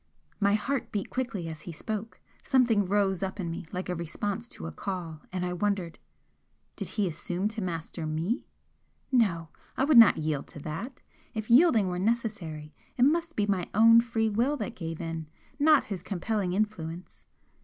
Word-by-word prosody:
My 200 +1 +4
heart 270 +5 -2
beat 205 -2 -3
quickly 230 -9 -3
as 160 -1 -7
he 175 - -7
spoke; 215 +6 -5 0.2
something 235 -6 +3
rose 195 -1 +1
up 190 +1 -3
in 170 -3 -2
me 165 0 -6
like 185 +1 -4
a 180 - -1
response 200 +7 -3
to 80 - -9
a 80 - -4
call, 165 - -5
and 180 -1 -2
I 180 - -2
wondered 185 -2 -1 0.8
Did - - -4
he 205 -2 +2
assume 180 +4 -2
to 220 0 -5
master 165 -2 -4
ME? 165 - -2 0.6
No! 180 - +2 0.3
I - - +2
would 280 -3 +7
not 225 - +8
yield 155 -2 -2
to - - -9
that! 200 - -6 0.3
If 220 +1 -3
yielding 240 - +6
were 180 0 -2
necessary, 185 -9 -2 0.2
it 245 - +4
must 330 +4 +2
be 205 - +2
my 195 -4 -1
own 230 +2 +8
free 225 -1 0
will 250 +8 +1
that 210 -6 -4
gave 165 -2 -5
in, 165 -2 -4 0.3
not 300 -1 +6
his 195 -4 -5
compelling 195 0 -2
influence! 185 -4 -3
200 Hz, 175 wpm, -28 LUFS, 170-225 Hz, 0.8 s, not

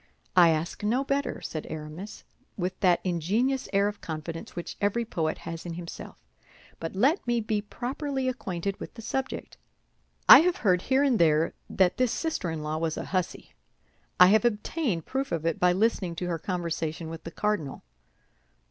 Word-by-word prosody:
"I 175 -2 +8
ask 160 +5 -1
no 240 +6 +2
better," 275 +1 -1
said 155 - -5
Aramis, 155 +6 -7 0.3
with 185 0 -3
that 180 -3 +3
ingenious 205 - 0
air 200 0 +3
of 205 0 -5
confidence 160 +1 -6
which 175 - -5
every 205 +4 +1
poet 160 -7 -1
has 165 -1 -7
in 175 - -5
himself; 170 -1 -8 0.6
"but 165 +3 -5
let 270 - +2
me 240 -1 +2
be 215 -1 -1
properly 265 +5 -3
acquainted 195 -6 -3
with - - -8
the 225 - -9
subject. 260 +3 -4 0.7
I 275 - +12
have 350 +3 +3
heard 180 -2 +4
here 265 +5 +2
and 265 -5 +3
there 160 -1 +3 0.2
that 185 -2 +2
this 255 -2 +2
sister 320 - -2
in 160 -2 -4
law 155 +1 -2
was 160 -1 -1
a - - -4
hussy. 185 -2 -3 0.7
I 180 0 +9
have 215 +1 +5
obtained 225 - -1
proof 270 +1 -2
of 165 -1 -2
it 165 - 0
by 180 0 +5
listening 190 -3 +1
to 180 +2 -3
her 165 -2 -2
conversation 165 -2 -3
with 165 0 -7
the - - -6
cardinal." 195 -7 -2
185 Hz, 175 wpm, -27 LUFS, 165-235 Hz, 0.7 s, I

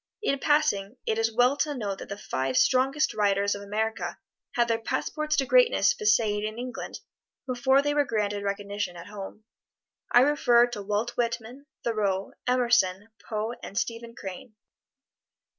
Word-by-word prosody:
In 275 -9 +1
passing, 260 -9 +1
it 220 0 0
is 225 0 +1
well 245 +4 +3
to 295 0 0
note 200 -6 -3
that - - -9
the 200 - -5
five 130 -8 -2
strongest 270 +4 +3
writers 200 -1 +2
of 205 - -6
America 220 +2 -2 0.4
had 240 -1 +3
their 230 -1 +1
passports 305 +6 -1
to 270 - +2
greatness - - +4
viséed 210 -1 +2
in 215 +1 -4
England 250 +1 -6 0.4
before 265 +2 +2
they 290 0 +1
were 290 0 +3
granted 210 -5 -1
recognition 200 -2 -3
at 170 - -9
home. 205 +1 -9 0.7
I 245 - +7
refer 245 -4 +5
to 210 -4 -5
Walt 210 +3 -1
Whitman, 235 +3 -3 0.2
Thoreau, 200 -4 -1 0.2
Emerson, 235 -6 +2 0.2
Poe 220 +1 -2
and 200 - -8
Stephen 230 0 -3
Crane. 195 +4 -8
225 Hz, 155 wpm, -27 LUFS, 205-255 Hz, 0.7 s, I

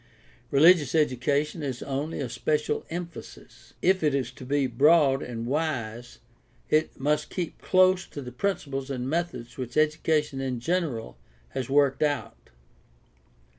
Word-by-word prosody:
Religious 150 0 +5
education 145 +2 +1
is 130 -4 -4
only 140 +4 -3
a 140 - -2
special 150 +5 -1
emphasis. 170 - -9
If 185 +1 +3
it 150 -3 +2
is 130 -3 -1
to 130 - -12
be 140 +2 +1
broad 140 +2 +4
and 115 -2 -5
wise 120 -5 -3 0.5
it 155 +1 +1
must 150 +2 0
keep 175 -3 -5
close 185 0 +3
to - - -8
the 125 - -7
principles 140 -4 -2
and 130 -2 -3
methods 135 -6 -3
which 125 -2 -5
education 155 -2 +1
in 130 -2 -2
general 125 - -2 0.3
has 130 -2 -4
worked 140 -1 +3
out. 145 -3 -2
145 Hz, 135 wpm, -27 LUFS, 130-155 Hz, 0.5 s, Religious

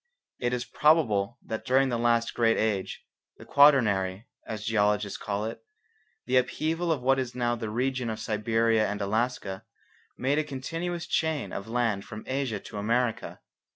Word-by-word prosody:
It 120 -1 0
is 125 -1 -2
probable 120 -9 +2
that 110 - -4
during 130 +1 +3
the 120 -2 -1
last 115 0 +2
great 115 -1 +2
age, 105 -4 -1 0.3
the - - -12
Quaternary, 105 -9 +4 0.2
as 105 -1 -5
geologists 105 -2 +1
call 105 +1 -2
it, 115 0 -6 0.6
the 130 - +2
upheaval 160 +6 0
of 140 -6 -1
what 135 +1 +3
is 125 -2 -4
now 120 -1 0
the 115 -2 -5
region 125 +2 -1
of 110 0 -4
Siberia 110 0 +1
and 105 0 -3
Alaska, 105 -1 -2 0.5
made 140 +4 +1
a - - +1
continuous 165 +5 -4
chain 160 -4 -1
of 100 - -5
land 115 -4 0
from 110 +1 -9
Asia 130 -4 -2
to 105 - -7
America. 115 +2 -1
120 Hz, 160 wpm, -27 LUFS, 110-130 Hz, 0.6 s, Quaternary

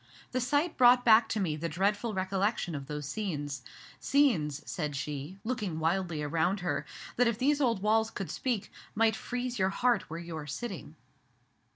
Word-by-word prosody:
The 255 - 0
sight 290 +7 +1
brought 245 0 +6
back 225 0 +6
to 220 - -1
me 170 -6 0
the 165 +2 -3
dreadful 205 +6 0
recollection 190 0 0
of 140 -2 -5
those 150 0 -4
scenes, 145 -7 -3 0.4
scenes," 175 - +2
said 150 -5 -3
she, 145 +5 -5
looking 215 -8 -2
wildly 165 -1 0
around 165 +6 0
her, 175 - -2 0.3
"that 245 0 +4
if 235 -2 0
these 285 +4 +2
old 230 -7 +1
walls 220 +1 +3
could 195 -4 -5
speak, 240 -6 -2 0.2
might 220 0 +3
freeze 245 +1 -4
your 190 0 +3
heart 240 +1 +1
where 165 - -5
you 170 -1 -7
are 150 -1 -6
sitting. 185 - -6
195 Hz, 175 wpm, -30 LUFS, 160-235 Hz, 0.4 s, brought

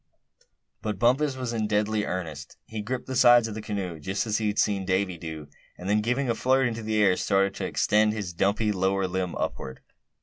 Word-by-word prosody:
But 105 -3 -3
Bumpus 130 +5 +2
was 125 -2 -3
in 110 -2 -1
deadly 105 0 0
earnest. 80 -6 -5
He 110 -1 -5
gripped 125 +4 -4
the 130 - -5
sides 120 -1 +6
of 110 - -6
his 110 - -6
canoe, 95 -6 -4
just 95 +8 -2
as 110 -1 0
he 110 - 0
had 105 - -2
seen 100 -2 +1
Davy 95 0 0
do; 80 -3 -7 0.3
and 90 - -8
then, 105 +1 +2
giving 125 +5 0
a 115 - +2
flirt 130 +3 +2
into 115 -1 -4
the 110 0 -1
air, 95 -2 +4
started 100 +1 +1
to - - -3
extend 105 0 +2
his 100 -5 -4
dumpy 100 +4 +1
lower 95 0 0
limbs 90 -1 -2
upward. 65 -1 -4
105 Hz, 210 wpm, -26 LUFS, 95-115 Hz, 0.3 s, sides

